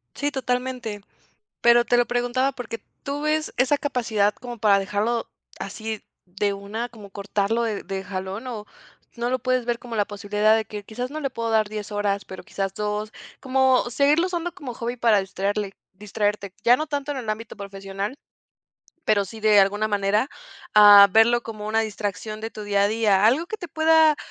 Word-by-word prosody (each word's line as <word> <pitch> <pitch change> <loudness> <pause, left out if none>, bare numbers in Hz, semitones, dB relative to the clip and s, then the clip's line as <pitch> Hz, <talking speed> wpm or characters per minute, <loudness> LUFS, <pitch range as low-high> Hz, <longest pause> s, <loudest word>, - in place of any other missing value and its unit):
Sí, 290 +1 -1
totalmente. 250 -4 -3 0.6
Pero 235 0 +5
te 245 - +2
lo 245 - +4
preguntaba, 245 +2 0
porque, 230 -3 -7 0.2
¿tú 280 +1 -3
ves 305 +1 0
esa 260 +3 +3
capacidad 225 -7 0
como 240 0 -9
para 205 -2 +4
dejarlo 210 +4 -1 0.3
así 220 -1 -5 0.2
de 200 +3 -1
una, 205 +4 -5
como 215 -4 -13
cortarlo 200 +3 -1
de 220 -3 -2
de 190 0 -5
jalón, 195 +4 -5
o 220 -4 -6 0.5
no 240 0 -2
lo 255 - +1
puedes 255 -1 0
ver 240 -1 0
como 235 -1 -8
la 205 -2 +2
posibilidad 210 +1 +1
de 220 - 0
que, 210 0 -7
quizás, 245 +6 -5
no 310 - -4
le 275 -3 -2
puedo 230 -2 -3
dar 215 -1 +2
10 210 -1 -6
horas, 205 -1 -1
pero, 190 - -9
quizás, 195 -1 -4
2 210 +1 -3 0.3
como 260 -1 +2
seguirlo 290 +7 +3
usando 350 -1 -3
como 280 -9 -7
hobby 240 +1 -4
para 225 -3 +4
distraerle 195 +1 -2 0.2
distraerte, 205 -1 -2
ya 240 +1 +6
no 310 +3 -4
tanto 290 -1 -3
en 275 - -4
el 230 -4 -6
ámbito 220 +1 -4
profesional, 195 +3 -6 0.9
pero 200 -2 +2
sí, 220 +4 -10
de 210 -1 +6
alguna 205 +2 +2
manera, 205 +4 +1 0.5
ah, 205 -1 +10
verlo 225 +4 +5
como 215 -2 -7
una 220 +1 +2
distracción 215 0 -4
de 225 +1 -5
tu 215 - -8
día 200 -1 +2
a 200 - +3
día? 210 -2 +2
Algo 270 +10 +3
que 435 - -5
te 350 - -8
pueda, 315 -1 +4
220 Hz, 190 wpm, -24 LUFS, 205-250 Hz, 0.9 s, ah